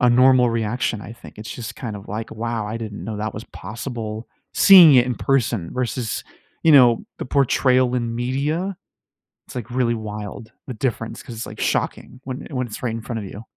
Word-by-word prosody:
a 125 Hz, -1 st, +5 dB
normal 125 Hz, 0 st, +5 dB
reaction, 115 Hz, 0 st, -1 dB
I 100 Hz, +4 st, -9 dB
think. 115 Hz, -, -14 dB
It's 110 Hz, 0 st, -7 dB
just 115 Hz, -2 st, -7 dB
kind 115 Hz, -5 st, -5 dB
of, 100 Hz, -, -12 dB
like, 110 Hz, +2 st, -5 dB
"Wow. 115 Hz, -1 st, -3 dB
I 110 Hz, -, -4 dB
didn't 110 Hz, -3 st, -6 dB
know 110 Hz, -2 st, -4 dB
that 110 Hz, 0 st, -3 dB
was 105 Hz, -, -7 dB
possible," 110 Hz, -1 st, -6 dB, 0.3 s
seeing 180 Hz, -7 st, +9 dB
it 125 Hz, 0 st, +5 dB
in 125 Hz, -, -1 dB
person 115 Hz, -10 st, 0 dB
versus, 125 Hz, -3 st, -2 dB, 0.4 s
you 160 Hz, -, +6 dB
know, 125 Hz, -4 st, +6 dB
the -, -, -4 dB
portrayal 130 Hz, -2 st, +3 dB
in 120 Hz, -2 st, -1 dB
media, 145 Hz, +10 st, -1 dB, 0.7 s
it's, -, -, -11 dB
like, 120 Hz, -2 st, -5 dB
really 120 Hz, -2 st, +1 dB
wild, 105 Hz, 0 st, -7 dB, 0.2 s
the 125 Hz, -, -4 dB
difference, 115 Hz, -1 st, -3 dB
'cause 120 Hz, -, -9 dB
it's, 115 Hz, -, -5 dB
like, -, -, -10 dB
shocking 125 Hz, -, -2 dB
when 130 Hz, 0 st, -6 dB
when 125 Hz, -3 st, -1 dB
it's 105 Hz, -, -8 dB
right 115 Hz, -3 st, -1 dB
in 115 Hz, -, -5 dB
front 115 Hz, -1 st, -4 dB
of 105 Hz, -, -6 dB
you. 105 Hz, +3 st, -9 dB
120 Hz, 205 wpm, -22 LUFS, 110-125 Hz, 0.7 s, seeing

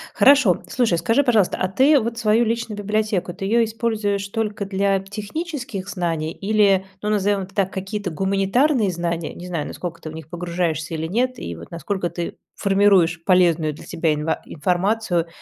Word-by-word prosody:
Хорошо. 270 Hz, -, +5 dB
Слушай, 230 Hz, -9 st, +1 dB
скажи, 225 Hz, +10 st, +2 dB
пожалуйста, 225 Hz, -8 st, +2 dB
а 185 Hz, -, 0 dB
ты 270 Hz, +10 st, +4 dB
вот 230 Hz, 0 st, -3 dB
свою 220 Hz, +1 st, +3 dB
личную 230 Hz, -1 st, -2 dB
библиотеку, 210 Hz, -3 st, -1 dB
ты 195 Hz, -, -5 dB
её 230 Hz, +4 st, +3 dB
используешь 215 Hz, -3 st, -1 dB
только 210 Hz, -1 st, -2 dB
для 195 Hz, 0 st, +1 dB
технических 210 Hz, -, -5 dB
знаний 170 Hz, -5 st, -2 dB
или, 200 Hz, -1 st, +2 dB, 0.2 s
ну, 210 Hz, -, 0 dB
назовем 205 Hz, -1 st, +1 dB
это 190 Hz, 0 st, -9 dB
так, 195 Hz, -1 st, 0 dB
какие-то 195 Hz, +1 st, -4 dB
гуманитарные 195 Hz, -, +2 dB
знания? 170 Hz, -1 st, -3 dB
Не 175 Hz, -, -9 dB
знаю, 170 Hz, -4 st, -3 dB
насколько 170 Hz, -2 st, -6 dB
ты 155 Hz, -, -6 dB
в -, -, -9 dB
них 160 Hz, -2 st, -9 dB
погружаешься 170 Hz, -2 st, -2 dB
или 160 Hz, 0 st, -3 dB
нет. 250 Hz, +7 st, 0 dB
И 85 Hz, -, -6 dB
вот 85 Hz, +1 st, -11 dB
насколько 175 Hz, +1 st, -3 dB
ты 170 Hz, 0 st, -5 dB, 0.2 s
формируешь 195 Hz, -4 st, +3 dB
полезную 170 Hz, -4 st, +3 dB
для 145 Hz, -, -12 dB
себя 165 Hz, -2 st, 0 dB
инва 150 Hz, +2 st, -2 dB
информацию, 180 Hz, +2 st, 0 dB
195 Hz, 170 wpm, -22 LUFS, 175-215 Hz, 0.2 s, Хорошо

